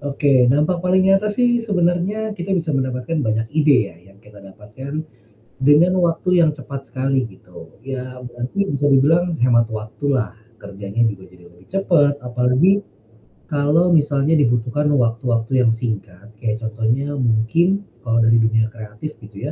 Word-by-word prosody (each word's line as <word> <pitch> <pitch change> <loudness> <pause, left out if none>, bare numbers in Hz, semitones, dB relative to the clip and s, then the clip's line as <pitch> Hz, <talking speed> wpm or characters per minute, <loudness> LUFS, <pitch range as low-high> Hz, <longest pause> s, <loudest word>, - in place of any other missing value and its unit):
Oke 140 -3 +2
dampak 150 +8 +2
paling 185 +2 +2
nyata 195 +2 +3
sih 240 +3 +1
sebenarnya 200 0 -1
kita 195 -2 -3
bisa 165 -3 -1
mendapatkan 130 +2 -2
banyak 110 -4 -1
ide 145 -9 +2
ya - - -18 0.2
yang 100 - -22
kita 105 -1 -16
dapatkan, 105 +10 -8 0.6
dengan 150 +7 +4
waktu 180 +2 0
yang 160 -3 +4
cepat 140 -1 -8
sekali 135 -1 -1
gitu 90 -5 -15
ya 130 -1 -7
berarti 125 +11 -4
bisa 140 0 -1
dibilang 165 +4 +2
hemat 120 -2 +4
waktu 110 +6 -7
lah, 115 -3 -2 0.2
kerjanya 100 +2 -5
juga 95 -3 -9
jadi 90 -1 -18
lebih 85 +1 -22
cepet 170 -7 +2
apalagi, 125 +11 +2 0.7
kalau 150 +5 +2
misalnya 145 -1 +2
dibutuhkan 125 0 +1
waktu-waktu 115 0 0
yang 120 - +3
singkat 110 -3 -6
kayak 110 -2 -1
contohnya 115 +6 -1
mungkin 145 - +1 0.2
kalau 115 -1 +1
dari 115 +1 +4
dunia 110 0 +1
kreatif 110 +6 -8
gitu 105 -1 -11
130 Hz, 150 wpm, -20 LUFS, 115-165 Hz, 0.7 s, dengan